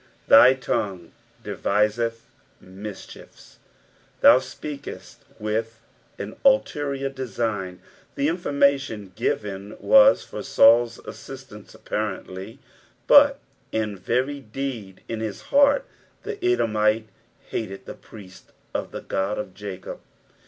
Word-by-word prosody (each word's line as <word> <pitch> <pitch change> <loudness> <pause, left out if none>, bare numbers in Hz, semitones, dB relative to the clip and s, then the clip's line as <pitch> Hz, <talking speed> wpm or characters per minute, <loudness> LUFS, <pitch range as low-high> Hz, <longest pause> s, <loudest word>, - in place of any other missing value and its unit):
ITiy 130 +4 +7
tongus 95 -8 -3 0.3
deviseth 115 +3 0 0.3
mitehie/i." 95 +2 -11 0.6
Thou - - +8
speokcst 145 +2 -8 0.2
with 110 +1 -3 0.4
an - - -6
ulterior 145 - +2
design. 110 -8 -3 0.4
The 140 - +1
informalion 140 - 0
given 100 +2 -3
was - - +6
for - - -7
Saul's 115 0 +5
assistance 110 0 -11
apparently, 100 0 -5 0.5
but - - +6 0.3
in 110 -2 -2
very 130 +9 -1
deed 115 -5 -6
in 115 - -4
his 110 -2 -5
heart 285 - +5 0.4
the 415 -3 -6
Edomite 110 - +2 0.4
hated 95 -4 -5
the - - -7
priests 95 -4 -15 0.2
of - - -3
the - - -7
Ood 95 +2 -2
of 95 -3 -5
Jacob. 95 -1 -8
110 Hz, 105 wpm, -24 LUFS, 105-135 Hz, 0.6 s, Thou